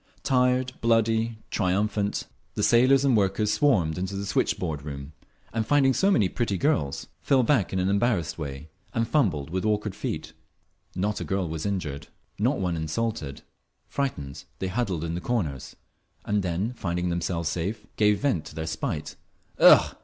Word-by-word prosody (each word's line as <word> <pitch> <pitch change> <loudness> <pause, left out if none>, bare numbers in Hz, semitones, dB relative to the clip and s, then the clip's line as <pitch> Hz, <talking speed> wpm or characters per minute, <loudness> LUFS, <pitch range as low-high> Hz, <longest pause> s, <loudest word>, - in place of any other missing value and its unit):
Tired, 125 0 +2
bloody, 115 0 +2
triumphant, 100 +2 0 0.3
the - - -1
sailors 130 +3 +5
and 135 -3 +4
workers 105 +1 +2
swarmed 90 - +2
into 95 +2 -3
the 100 +1 -3
switchboard 75 -5 -1
room, 70 0 -7 0.4
and 110 0 0
finding 135 +2 +4
so 195 +9 +3
many 110 - +4
pretty 100 0 -1
girls, 80 - 0 0.2
fell 135 -2 +3
back 120 -5 +2
in 95 - -1
an 90 0 +1
embarrassed 100 -5 +1
way 75 -1 -6 0.3
and 115 0 +1
fumbled 90 - +1
with 95 +1 -1
awkward 105 -1 0
feet. 80 - -5 0.6
Not 105 +3 -1
a - - -1
girl 95 -2 -1
was 80 +3 -3
injured, 85 -9 -3 0.3
not - - +2
one 90 -3 0
insulted. 80 -2 -3 0.4
Frightened, 75 - -3
they 95 - -3
huddled 95 -6 -1
in 85 0 -2
the 85 - -3
corners, 85 - -2 0.5
and 105 0 +1
then, 95 +6 -1
finding 90 -5 -2
themselves 85 -1 -1
safe, 95 +6 -3
gave 105 -1 +3
vent 115 - +1
to 75 - -11
their 80 0 -3
spite. 75 -1 -4 0.4
"Ugh! - - +7
100 Hz, 160 wpm, -26 LUFS, 80-115 Hz, 0.6 s, Ugh